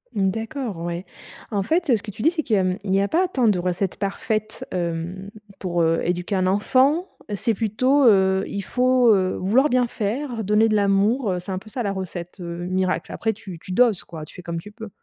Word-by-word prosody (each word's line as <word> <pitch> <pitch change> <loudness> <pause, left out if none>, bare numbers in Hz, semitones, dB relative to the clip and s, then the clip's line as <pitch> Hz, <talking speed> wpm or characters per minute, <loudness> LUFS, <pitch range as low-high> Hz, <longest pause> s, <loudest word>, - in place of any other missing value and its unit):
D'accord, 225 - -2
ouais. 170 +2 -4 0.5
En 205 -2 0
fait, 330 - 0
heu, 235 - +6
ce 210 - -3
que 215 - -9
tu 210 +4 -6
dis, 320 - +5
c'est 340 -2 -1
que, 215 -6 +2
mmh, 185 0 0
il 195 -1 0
y 195 - +3
a 200 - +1
pas 365 - +2
tant 255 -10 +1
de 195 -4 +3
recettes 180 +1 -1
parfaites, 215 +2 -3
hem, 175 +2 -3 0.3
pour, 175 -3 0
heu, 165 0 +2
éduquer 180 +3 -1
un 185 0 +1
enfant. 260 - +3 0.3
C'est 230 +3 0
plutôt, 255 +6 +2
heu, 190 -2 +4
il 200 -1 -4
faut, 250 -1 +4
heu, 185 -2 +1
vouloir 245 +10 +3
bien 250 0 +3
faire, 230 +3 -3
donner 210 +2 +3
de 215 - +1
l'amour, 205 +3 +2
heu, 180 - -1
c'est 180 +2 -6
un 185 - -2
peu 215 - -15
ça, 240 +2 -3
la 200 - -1
recette, 180 -1 -6
heu, 170 0 -5
miracle? 185 0 -1
Après 220 -1 -1
tu 190 -5 -10
tu 185 - -10
doses, 225 -1 +3
quoi. 160 -2 -8
Tu - - -16
fais - - -10
comme 170 -1 -4
tu 210 +5 -11
peux. 220 0 -9
200 Hz, 230 wpm, -23 LUFS, 185-230 Hz, 0.5 s, heu